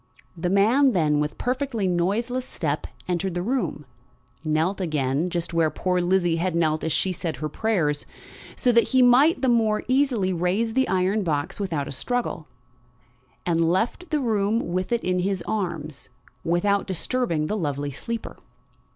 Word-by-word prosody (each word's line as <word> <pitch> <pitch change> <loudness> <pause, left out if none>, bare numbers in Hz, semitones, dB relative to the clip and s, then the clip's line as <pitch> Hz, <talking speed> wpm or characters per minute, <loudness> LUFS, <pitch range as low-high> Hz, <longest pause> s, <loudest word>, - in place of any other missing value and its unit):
The 175 +1 -2
man 230 +8 +4
then 150 -4 +2
with 150 0 -2
perfectly 250 -4 -1
noiseless 220 +9 0
step 150 -2 -3 0.2
entered 180 0 -1
the 175 - -1
room, 235 - -2 0.6
knelt 160 +5 0
again, 150 -1 0
just 170 -1 -3
where 165 -2 +3
poor 180 +2 0
Lizzie 175 -2 +2
had 175 0 -1
knelt 155 -2 +1
as 160 - -1
she 190 - +1
said 165 -3 -3
her 155 +4 -3
prayers, 155 -5 -1 0.5
so 250 - +2
that 235 0 +4
he 255 - +7
might 270 +6 +5
the - - +3
more 225 -3 +2
easily 255 -8 +2
raise 185 +6 0
the 265 +2 +2
iron 190 +3 +1
box 150 -1 -2
without 165 -8 -2
a - - -6
struggle, 230 - -3 1.0
and 165 -1 +2
left 230 - -1
the 305 -1 +1
room 215 -5 0
with 185 +3 -2
it 235 -1 0
in 180 0 0
his 190 0 -1
arms 165 -9 -3 0.3
without 200 +5 +1
disturbing 190 -3 -1
the 210 - -2
lovely 145 -6 -2
sleeper. 230 - -6
185 Hz, 160 wpm, -24 LUFS, 165-230 Hz, 1.0 s, he